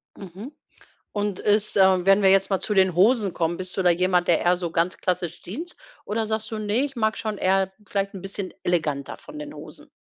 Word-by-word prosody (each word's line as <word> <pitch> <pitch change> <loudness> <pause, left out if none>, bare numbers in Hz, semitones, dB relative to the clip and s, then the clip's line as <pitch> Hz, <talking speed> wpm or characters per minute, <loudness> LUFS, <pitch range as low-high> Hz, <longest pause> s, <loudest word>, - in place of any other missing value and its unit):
Mhm. 195 - -9 0.6
Und 205 -2 -2
ist 210 0 +1
äh, 190 -2 +4
wenn 195 +1 +5
wir 195 - +5
jetzt 195 +1 +4
mal 190 - +2
zu 210 - -2
den 190 -2 +4
Hosen 205 0 +3
kommen, 170 0 -1
bist 185 0 -6
du 190 - 0
da 180 - +5
jemand, 180 0 +2
der 170 - +4
eher 175 +1 +3
so 175 -1 -3
ganz 170 +2 0
klassisch 175 -2 -2
Jeans 320 - -7 0.3
oder 220 +1 -1
sagst 220 0 -3
du: 220 - -3
„Ne, 215 +5 +1
ich 275 -1 -8
mag 220 -2 0
schon 215 -2 -3
eher 190 0 +2 0.2
vielleicht 200 0 -2
'n 190 - -8
bisschen 195 -1 -4
eleganter 150 -5 -1
von 300 0 -11
den 295 0 -7
Hosen?“ - - -12
195 Hz, 220 wpm, -24 LUFS, 180-215 Hz, 0.6 s, wenn